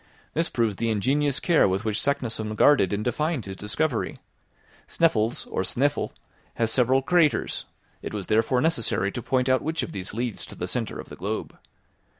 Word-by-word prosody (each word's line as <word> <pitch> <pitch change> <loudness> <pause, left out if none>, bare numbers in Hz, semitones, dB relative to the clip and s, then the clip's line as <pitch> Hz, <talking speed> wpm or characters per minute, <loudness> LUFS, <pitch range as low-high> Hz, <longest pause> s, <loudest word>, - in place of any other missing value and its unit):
This 165 +2 0
proves 115 -5 0
the 115 - 0
ingenious 135 +6 +1
care 170 - +4
with 95 +3 -1
which 110 0 0
Saknussemm 115 -6 -1
guarded 130 -5 +5
and 105 +1 -1
defined 145 +1 -1
his 95 -1 -6
discovery. 115 +6 -1 0.7
Sneffels, 120 -8 +1
or - - -2
Snæfell, 140 +9 0 0.5
has 115 -1 +1
several 130 +2 +3
craters. 170 -1 +2 0.4
It - - -5
was 105 -3 -4
therefore 115 +5 +2
necessary 115 -10 +1
to 120 - -5
point 125 +2 0
out 130 0 +3
which 160 -2 -2
of - - -5
these 95 -1 -5
leads 115 0 -4
to - - -10
the - - -4
centre - - -2
of - - -9
the - - -9
globe. 105 +5 -4
120 Hz, 175 wpm, -25 LUFS, 105-145 Hz, 0.7 s, guarded